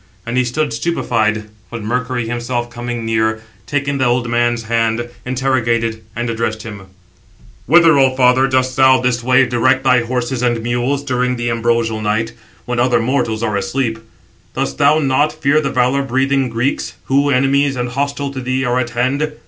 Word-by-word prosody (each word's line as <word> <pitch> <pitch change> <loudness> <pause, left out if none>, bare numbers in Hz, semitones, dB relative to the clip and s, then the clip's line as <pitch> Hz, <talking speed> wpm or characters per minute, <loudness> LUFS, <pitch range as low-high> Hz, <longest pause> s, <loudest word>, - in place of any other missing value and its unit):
And 115 +1 -4
he 130 - +3
stood 145 +5 -2
stupified; 110 -10 0 0.3
but 115 -2 -6
Mercury 120 +1 -2
himself 120 0 -3
coming 120 -1 -5
near, 110 0 0 0.2
taking 145 -1 -1
the 130 - +2
old 120 0 +1
man's 120 0 0
hand, 115 +1 0 0.2
interrogated, 120 -3 0
and 120 +1 -2
addressed 110 -1 -2
him: 100 -4 -9 0.8
"Whither, 165 0 +6
O 130 -1 +3
father, 130 +1 +4
dost 130 -1 0
thou 130 -1 +5
this 125 -1 0
way 130 +1 +4
direct 125 +2 +1
thy 125 -2 +4
horses 125 +1 -2
and 120 -2 0
mules 120 +4 -1
during 125 -2 0
the 120 -1 -2
ambrosial 115 -1 0
night, 110 +2 -1 0.3
when 125 0 -2
other 125 0 +3
mortals 115 -2 -1
are 105 -3 -1
asleep? 115 +3 -2 0.6
Dost 70 0 -3
thou 150 +2 +5
not 145 0 +2
fear 155 0 +1
the 140 - -1
valour 130 +2 +1
breathing 135 0 0
Greeks, 120 +4 -2
who, 140 +2 +1
enemies 135 +1 +2
and 125 -1 -2
hostile 140 +2 -2
to 130 - -5
thee, 130 +1 -1
are 125 +1 +1
at 120 -2 -2
hand? 140 +5 0
125 Hz, 175 wpm, -17 LUFS, 115-135 Hz, 0.8 s, Whither